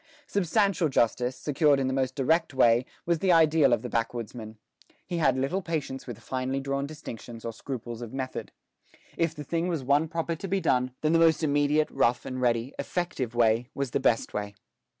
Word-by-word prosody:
Substantial 195 -2 +1
justice, 125 0 +1
secured 145 -1 +2
in 135 - 0
the 130 - 0
most 130 -1 -1
direct 160 +2 +1
way, 120 0 +4 0.2
was 170 -1 +1
the 190 +1 +2
ideal 160 -4 +5
of 120 - +2
the - - -3
backwoodsman. 115 -1 -4 0.5
He 175 - -3
had 135 -5 +3
little 140 +9 0
patience 155 -7 -4
with 120 -4 -6
finely 130 +1 -3
drawn 140 0 -2
distinctions 120 -6 -9
or 115 - -3
scruples 120 -1 -6
of 115 -2 -7
method. 130 -1 -5 0.6
If 165 -1 0
the 150 - -6
thing 165 +4 -1
was 165 -6 -2
one 145 +4 +3
proper 165 +1 -2
to 195 - -6
be 195 +1 0
done, 130 -6 +1
then 155 +1 +2
the 165 - +5
most 165 -1 +4
immediate, 145 +1 +2
rough 120 +1 +1
and 130 0 -4
ready, 120 +1 +1
effective 140 -10 -3
way 120 +1 +2
was 140 -3 -2
the - - +1
best 120 -4 +1
way. 100 -1 -4
135 Hz, 190 wpm, -27 LUFS, 125-160 Hz, 0.6 s, ideal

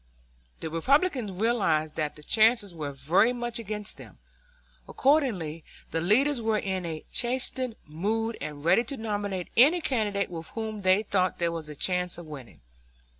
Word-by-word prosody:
The 160 - -4
Republicans 260 - +2
realized 185 -7 +1
that 150 -2 -2
the 150 - -13
chances 220 0 +3
were 150 -4 -4
very 160 - +3
much 240 -1 -3
against 210 -1 -5
them. - - -13 0.7
Accordingly 215 - +1 0.3
the 165 - -1
leaders 245 - +3
were 220 -1 +1
in 190 -3 -2
a 160 -2 -6
chastened 255 -1 0
mood 220 +9 -2
and 150 0 -6
ready 225 +7 +5
to 275 +3 -5
nominate 205 -4 -3
any 295 +9 +6
candidate 210 - -1
with 165 -2 -6
whom 220 -2 -4
they 190 +2 +4
thought 185 -3 0
there 170 -1 +1
was 165 -2 -6
a 150 - -7
chance 180 +3 -1
of 175 - -9
winning. 135 - -11
200 Hz, 160 wpm, -27 LUFS, 165-230 Hz, 0.7 s, any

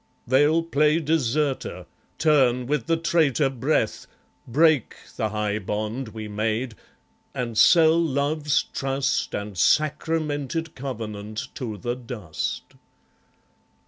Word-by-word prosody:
They'll 145 +6 +3
play 150 -1 +2
deserter, 150 -3 -1 0.3
turn 130 -6 +3
with 150 +5 -1
the 165 0 +2
traitor 160 -4 +2
breath, 130 -3 -1 0.4
Break 150 +1 +3 0.2
the 110 - -1
high 105 0 -1
bond 110 +5 -3
we 110 0 -7
made, 110 +3 -2 0.6
and 120 -2 -3
sell 165 +6 +6
Love's 145 -1 +1
trust 135 +1 -1
And 105 -1 -5
sacramented 155 - 0
covenant 110 -2 -6
to 110 -5 -5
the 120 +2 -3
dust. 115 -10 -5
135 Hz, 105 wpm, -24 LUFS, 110-155 Hz, 0.6 s, sell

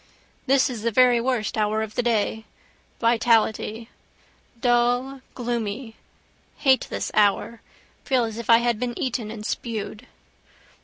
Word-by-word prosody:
This 270 0 +4
is 240 -4 -5
the 230 - 0
very 245 0 +4
worst 245 -3 -1
hour 215 +1 +1
of 215 -1 -7
the - - 0
day. 220 -2 0 0.5
Vitality. 225 -1 +1 0.7
Dull, 245 +2 +1
gloomy: 235 -1 -4 0.6
hate 265 -3 +3
this - - -4
hour. 215 +2 +1 0.4
Feel 260 -3 +1
as 225 0 -4
if 235 - -8
I 230 - +8
had 235 -2 0
been 245 -1 -3
eaten 245 -4 -2
and 215 -1 -7
spewed. 225 +1 -5
235 Hz, 135 wpm, -24 LUFS, 220-245 Hz, 0.7 s, I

